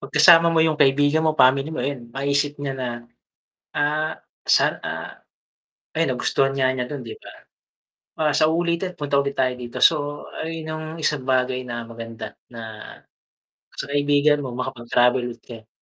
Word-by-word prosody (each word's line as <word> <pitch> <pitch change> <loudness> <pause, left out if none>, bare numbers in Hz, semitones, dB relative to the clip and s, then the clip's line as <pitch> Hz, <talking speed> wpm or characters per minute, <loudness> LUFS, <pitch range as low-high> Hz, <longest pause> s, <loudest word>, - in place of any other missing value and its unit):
'pag - - -9
kasama 165 +2 +8
mo 165 - 0
yung 160 -1 +1
kaibigan 145 +3 +4
mo, 155 -1 +1
family 135 +2 +4
mo, 160 - -6
ayun 130 -4 -4
maisip 140 +1 0
niya 140 -1 -4
na, 130 -1 -4 0.9
ah, 155 +2 0 0.3
san, - - +3
ah - - -6 0.8
ayan - - +2
nagustuhan 135 0 +1
nga 135 -1 +2
niya 130 -1 -1
dun 140 +1 -6
'di 115 -2 -8
ba? - - -13 0.9
"Ah, 155 -2 +1
sa 155 +2 +3
uulitin 170 +2 -1
punta 145 -1 +1
ulit 140 0 -4
tayo 130 -1 +2
dito," 125 -1 -8
so 145 -2 +2 0.2
ayun 160 0 -5
yung 155 0 -5
isang 150 -3 0
bagay 130 0 0
na 120 -2 -6
maganda, 115 0 -8 0.2
na 115 -1 -9 1.2
sa - - -4
kaibigan 145 +1 +3
mo 130 -4 -5
makapag-travel 125 0 +1
ulit 120 - -10
kayo. 115 -2 -11
140 Hz, 165 wpm, -22 LUFS, 125-155 Hz, 1.2 s, kasama